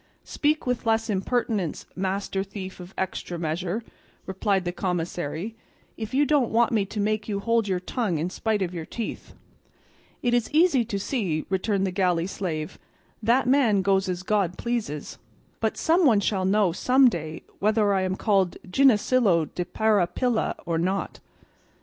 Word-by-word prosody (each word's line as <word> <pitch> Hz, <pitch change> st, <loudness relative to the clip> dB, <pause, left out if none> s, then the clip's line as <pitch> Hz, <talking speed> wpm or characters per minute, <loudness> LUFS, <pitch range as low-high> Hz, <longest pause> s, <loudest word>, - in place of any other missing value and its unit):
"Speak 300 Hz, +1 st, 0 dB
with 250 Hz, -2 st, -2 dB
less 225 Hz, 0 st, +2 dB
impertinence, 200 Hz, -3 st, -1 dB
master 195 Hz, +1 st, -2 dB
thief 190 Hz, -1 st, -8 dB
of 180 Hz, +1 st, -10 dB
extra 185 Hz, -2 st, -3 dB
measure," 170 Hz, +6 st, -2 dB, 0.4 s
replied 190 Hz, 0 st, 0 dB
the 175 Hz, -, -1 dB
commissary, 175 Hz, +1 st, -3 dB, 0.4 s
"if 220 Hz, -2 st, -6 dB
you 285 Hz, +3 st, +3 dB
don't 280 Hz, -4 st, +2 dB
want 230 Hz, +1 st, +3 dB
me 215 Hz, -4 st, +2 dB
to 210 Hz, -, -5 dB
make 215 Hz, +1 st, -1 dB
you 200 Hz, -1 st, -1 dB
hold 230 Hz, +1 st, +1 dB
your 185 Hz, -2 st, 0 dB
tongue 190 Hz, -1 st, -2 dB
in 170 Hz, +4 st, -2 dB
spite 215 Hz, -1 st, 0 dB
of 180 Hz, -1 st, -4 dB
your 170 Hz, -2 st, -4 dB
teeth." 230 Hz, -3 st, -6 dB, 0.9 s
"It 240 Hz, -1 st, +2 dB
is 240 Hz, -2 st, +1 dB
easy 305 Hz, -5 st, +4 dB
to 210 Hz, -3 st, -3 dB
see," 195 Hz, -, -2 dB
returned 195 Hz, +1 st, +1 dB
the 190 Hz, -, -1 dB
galley 180 Hz, -3 st, +1 dB
slave, 165 Hz, -5 st, -4 dB, 0.4 s
"that 235 Hz, +4 st, +3 dB
man 245 Hz, -8 st, +3 dB
goes 195 Hz, 0 st, +2 dB
as 180 Hz, 0 st, -3 dB
God 190 Hz, -3 st, 0 dB
pleases, 225 Hz, -12 st, -3 dB, 0.4 s
but -, -, -1 dB
some 340 Hz, +3 st, +3 dB
one 235 Hz, -9 st, +5 dB
shall 195 Hz, -2 st, 0 dB
know 195 Hz, -1 st, +3 dB
some 255 Hz, +9 st, +4 dB
day 160 Hz, -7 st, -3 dB, 0.2 s
whether 210 Hz, 0 st, +2 dB
I 190 Hz, -, +2 dB
am 185 Hz, 0 st, -1 dB
called 195 Hz, -4 st, +1 dB
Ginesillo 215 Hz, -, +3 dB
de 180 Hz, -, -2 dB
Parapilla 215 Hz, +4 st, +1 dB
or 165 Hz, -1 st, 0 dB
not." 190 Hz, +3 st, -2 dB
200 Hz, 160 wpm, -25 LUFS, 180-230 Hz, 0.9 s, one